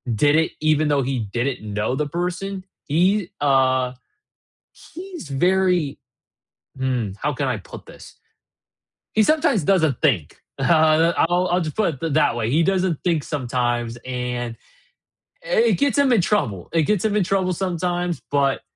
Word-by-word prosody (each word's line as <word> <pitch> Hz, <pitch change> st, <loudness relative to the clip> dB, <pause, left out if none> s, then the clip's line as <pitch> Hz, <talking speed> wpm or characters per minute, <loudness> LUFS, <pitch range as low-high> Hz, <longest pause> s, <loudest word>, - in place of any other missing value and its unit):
did 145 Hz, +7 st, +3 dB
it, 160 Hz, -, +1 dB
even 155 Hz, 0 st, +2 dB
though 145 Hz, -2 st, +2 dB
he 135 Hz, 0 st, -2 dB
didn't 120 Hz, +5 st, -2 dB
know 105 Hz, +5 st, -1 dB
the 150 Hz, +2 st, -1 dB
person 180 Hz, +4 st, -4 dB, 0.2 s
he, 185 Hz, +5 st, +1 dB
uh, 130 Hz, -2 st, +2 dB, 1.0 s
he's 355 Hz, -, -8 dB
very 175 Hz, 0 st, +1 dB, 0.8 s
mm, 125 Hz, -6 st, -2 dB
how 150 Hz, -, -1 dB
can 140 Hz, +2 st, -2 dB
I 125 Hz, -4 st, -1 dB
put 95 Hz, -, -12 dB
this? -, -, -14 dB, 1.0 s
He 215 Hz, -, +4 dB
sometimes 300 Hz, -, +2 dB
doesn't 160 Hz, -7 st, +2 dB
think, 110 Hz, -, 0 dB, 0.2 s
uh, 160 Hz, +2 st, +4 dB, 0.2 s
I'll 180 Hz, +1 st, +1 dB
I'll 180 Hz, +1 st, +2 dB
just 155 Hz, -3 st, -4 dB
put 165 Hz, -11 st, -1 dB
it 160 Hz, -3 st, -1 dB
that 145 Hz, -6 st, +3 dB
way, 115 Hz, -2 st, -1 dB
he 155 Hz, +6 st, +3 dB
doesn't 185 Hz, -3 st, 0 dB
think 165 Hz, -4 st, +1 dB
sometimes, 120 Hz, -4 st, -2 dB
and 125 Hz, -2 st, -4 dB, 0.9 s
i -, -, -10 dB, 0.2 s
it -, -, 0 dB
gets 285 Hz, 0 st, +1 dB
him 280 Hz, -3 st, +4 dB
in 220 Hz, -, +4 dB
trouble 125 Hz, -, -1 dB
it 165 Hz, -1 st, +2 dB
gets 205 Hz, +3 st, 0 dB
him 215 Hz, -1 st, 0 dB
in 200 Hz, -, +1 dB
trouble 190 Hz, 0 st, 0 dB
sometimes, 175 Hz, -1 st, -2 dB
but 140 Hz, -1 st, +1 dB
155 Hz, 155 wpm, -22 LUFS, 130-185 Hz, 1.0 s, He